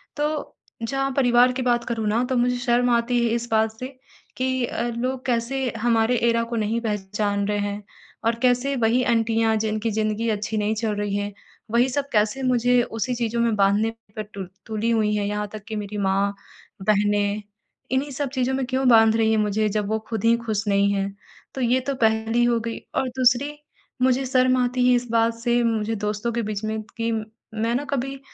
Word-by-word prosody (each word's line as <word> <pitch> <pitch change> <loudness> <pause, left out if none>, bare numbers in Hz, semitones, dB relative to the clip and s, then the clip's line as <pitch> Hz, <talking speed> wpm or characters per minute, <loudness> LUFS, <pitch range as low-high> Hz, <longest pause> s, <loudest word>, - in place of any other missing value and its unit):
तो 300 0 -2 0.3
जहाँ 270 +4 -1
परिवार 245 -1 +4
की 260 - -3
बात 240 -1 +1
करूँ 225 -2 -2
ना 225 +4 +2
तो 260 - 0
मुझे 245 +1 +2
शर्म 245 0 +2
आती 240 +1 +2
है - - +1
इस 235 0 -3
बात 220 0 +3
से 255 - -4 0.5
कि 260 0 0
अ, - - -3
लोग 255 +1 -3
कैसे 250 +2 0
हमारे 230 +1 +2
एरा 230 0 +2
को 235 - -3
नहीं 225 +1 0
पहचान 205 -1 -1
रहे 210 0 0
हैं 205 0 -3 0.4
और 230 0 +2
कैसे 255 +2 +2
वही 240 +1 +2
आंटियाँ 225 -1 +2
जिनकी 215 +1 -1
ज़िंदगी 215 +1 -1
अच्छी 215 0 -2
नहीं 210 +1 0
चल 220 -1 -1
रही 205 -1 -2
है 205 0 -2 0.4
वही 240 +2 +4
सब 280 +2 -2
कैसे 215 +5 +1
मुझे 245 -1 +3
उसी 235 +1 -3
चीज़ों 235 0 -1
में 230 -2 +2
बाँधने 200 +2 +3 0.3
पर 215 - -3
टुल 195 -2 -6 0.2
तुली 220 +1 -2
हुई 215 -2 +2
हैं 205 - 0
यहाँ 210 0 -2
तक 215 -2 -8
कि 220 - -4
मेरी 210 0 -5
माँ, 200 0 +1 0.5
बहनें। 205 0 +1 0.5
इन्हीं 270 +2 0
सब 275 +1 -3
चीज़ों 260 -1 0
में 265 -1 -1
क्यों 260 0 0
बाँध 225 -1 +6
रही 220 -1 +3
है 220 - +3
मुझे 215 0 +1
जब 210 0 -1
वो 220 0 0
ख़ुद 220 -3 -3
ही 230 +1 +5
ख़ुश 215 -2 -1
नहीं 200 0 +3
हैं। 195 0 -2 0.4
तो 265 - -3
ये 250 +1 +3
तो 275 - 0
पहली 225 0 +2
हो 235 -1 +2
गई। 230 0 -4 0.2
और 260 - 0
दूसरी, 255 +3 +3 0.5
मुझे 260 +1 +3
शर्म 255 0 +3
आती 250 0 +1
है 250 - +5
इस 245 0 -1
बात 230 0 +3
से 240 0 +1
मुझे 225 -1 0
दोस्तों 210 +2 -2
के 235 - 0
बीच 210 -1 -4
में 220 0 -2 0.2
कि 230 0 -1
मैं 220 +1 -3
ना 280 +4 -1
कभी 270 0 -2
230 Hz, 205 wpm, -23 LUFS, 215-245 Hz, 0.5 s, बाँध